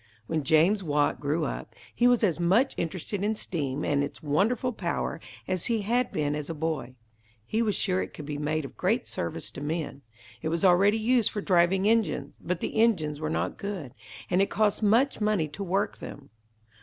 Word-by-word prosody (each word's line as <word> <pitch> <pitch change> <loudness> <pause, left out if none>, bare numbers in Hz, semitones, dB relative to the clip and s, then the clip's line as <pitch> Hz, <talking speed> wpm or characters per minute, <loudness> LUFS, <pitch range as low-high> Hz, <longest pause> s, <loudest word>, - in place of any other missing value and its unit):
When 155 +6 -1
James 165 +8 +4
Watt 145 -3 +1
grew 150 +2 0
up, - - -5 0.2
he 240 - +3
was 245 -2 +4
as 175 -5 +2
much 195 +10 +3
interested 185 +4 -3
in 215 +1 +1
steam 145 -8 -2
and 140 -1 +2
its 145 +3 -6
wonderful 220 - +1
power, - - -3 0.3
as 185 -2 -1
he 230 -2 +1
had 240 +4 +1
been 150 -2 0
as 150 0 -4
a 165 - -3
boy. 150 -6 -3 0.5
He 220 - 0
was 215 -3 +1
sure 185 -2 0
it - - -5
could 150 - -9
be 145 0 -4
made 150 0 -1
of - - -10
great 225 +7 0
service 85 +5 -4
to 125 - -8
men. 150 -1 -3 0.4
It 160 - -2
was 165 +3 0
already 195 +4 +5
used 235 0 +3
for 210 - -4
driving 185 +1 +3
engines, 200 -11 +1
but 180 0 -2
the 220 - 0
engines 155 -11 +2
were 155 - -1
not - - -2
good, 190 -11 -5 0.3
and 180 - +2
it 195 - +2
cost 215 0 +1
much 230 +5 +3
money 210 -7 +2
to 200 +8 -6
work 195 +3 -1
them. 140 - -9
175 Hz, 200 wpm, -27 LUFS, 150-210 Hz, 0.5 s, already